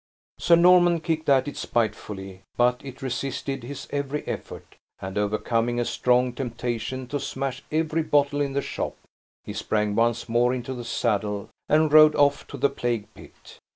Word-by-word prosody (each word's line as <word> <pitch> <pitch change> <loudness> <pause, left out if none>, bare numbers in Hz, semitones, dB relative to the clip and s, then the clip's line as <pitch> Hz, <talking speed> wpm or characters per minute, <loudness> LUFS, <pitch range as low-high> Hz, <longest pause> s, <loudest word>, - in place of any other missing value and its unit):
Sir 170 - +5
Norman 175 0 +5
kicked 160 -2 -2
at 135 0 +4
it 145 - -5
spitefully, 100 -4 -3 0.2
but 125 +1 +2
it 135 -1 -9
resisted 135 +1 -3
his 135 +3 -7
every 145 +1 -3
effort; - - -7 0.2
and, 95 0 -6
overcoming 115 +3 0
a 120 - 0
strong 125 +1 +2
temptation 125 0 -4
to 145 - -2
smash 135 0 -4
every 160 +1 0
bottle 145 -1 +2
in 140 -1 -1
the 140 0 -1
shop, - - -4 0.5
he - - -7
sprang 105 -1 -1
once 115 +2 +1
more 120 +2 +2
into 125 +1 -5
the 120 -2 -7
saddle, 105 -3 -1 0.2
and 155 0 +3
rode 155 0 +8
off 145 -1 +2
to - - -8
the - - +3
plague 120 -4 -3
pit. - - -16
130 Hz, 165 wpm, -25 LUFS, 115-145 Hz, 0.5 s, rode